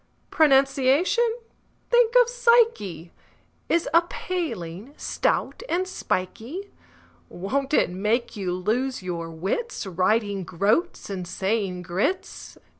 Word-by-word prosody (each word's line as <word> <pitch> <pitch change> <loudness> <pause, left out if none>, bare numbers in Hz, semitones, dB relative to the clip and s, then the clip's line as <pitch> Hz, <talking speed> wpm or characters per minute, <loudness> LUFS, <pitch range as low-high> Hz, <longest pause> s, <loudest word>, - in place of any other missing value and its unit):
Pronunciation—think 355 - +2
of - - +5
psyche!— 460 - +2 0.6
Is 340 0 +2
a 335 - +7
paling, 260 - -5
stout - - -1
and 370 +2 0
spikey; 285 - -4 0.6
Won't 270 +10 -2
it - - +3
make 210 +6 -1
you 190 -4 -2
lose 225 +7 -1
your 170 -2 -4
wits, 195 - -3
Writing 195 +2 0
"groats" 205 - 0
and 185 -2 -4
saying 190 -1 -2
groats? 210 - -3
230 Hz, 100 wpm, -25 LUFS, -, 0.6 s, a